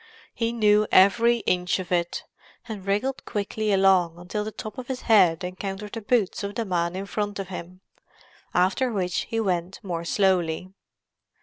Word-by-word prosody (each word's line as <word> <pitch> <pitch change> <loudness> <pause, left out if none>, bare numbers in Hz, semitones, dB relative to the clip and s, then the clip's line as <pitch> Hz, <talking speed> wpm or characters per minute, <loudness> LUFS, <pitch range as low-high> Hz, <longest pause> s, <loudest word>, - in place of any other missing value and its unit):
He 230 -1 -1
knew 215 -2 +3
every 230 +5 +5
inch 180 0 +1
of 185 -2 -7
it, 175 -1 0 0.4
and 205 -4 -7
wriggled 230 +7 -1
quickly 210 +1 -2
along 190 -4 +3
until 180 +4 -4
the 215 - -5
top 215 +2 -7
of 250 - -7
his 260 -1 -4
head 180 -8 +4
encountered 195 +3 -5
the 225 - -5
boots 215 -3 0
of 200 0 -4
the 230 - -1
man 175 -2 -1
in 195 +1 -4
front 205 0 -3
of 195 -2 -5
him, 180 0 -8 0.7
after 190 +8 +2
which 180 -4 -1
he 225 - -1
went 185 -3 -1
more 170 -4 -3
slowly. 185 -1 +1
195 Hz, 170 wpm, -25 LUFS, 180-215 Hz, 0.7 s, every